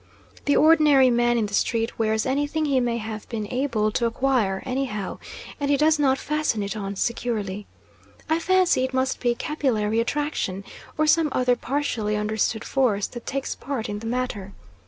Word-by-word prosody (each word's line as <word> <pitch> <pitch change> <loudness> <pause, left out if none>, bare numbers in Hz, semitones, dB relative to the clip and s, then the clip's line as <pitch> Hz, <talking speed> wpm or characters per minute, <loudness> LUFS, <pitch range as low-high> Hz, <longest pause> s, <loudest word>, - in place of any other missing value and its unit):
The 285 - +3
ordinary 300 -5 +6
man 240 0 +2
in 225 - +1
the 205 - -7
street 230 +2 0
wears 220 -1 +1
anything 290 +4 0
he 275 -3 +2
may 240 -2 0
have 220 -1 -6
been 220 -3 -3
able 235 -5 0
to 235 +2 +1
acquire, 230 -5 0
anyhow, 255 -7 -3 0.4
and 285 -1 -1
he 285 - +3
does 305 +1 +3
not 270 -2 +3
fasten 300 -9 -1
it 200 +2 -4
on 200 -2 -4
securely. 210 -3 -2 0.6
I 320 +1 +1
fancy 370 -6 +3
it 260 0 -2
must 260 0 0
be 240 -1 +1
capillary 230 -8 0
attraction, 235 -7 -2 0.3
or 310 - +3
some 310 0 +3
other 250 -1 +2
partially 240 -5 -2
understood 215 +1 -1
force, 235 -7 +1
that 240 -1 -9
takes 275 0 -2
part 270 -5 -4
in 205 0 -4
the 225 - -6
matter. 225 -5 -3
245 Hz, 175 wpm, -24 LUFS, 215-280 Hz, 0.6 s, ordinary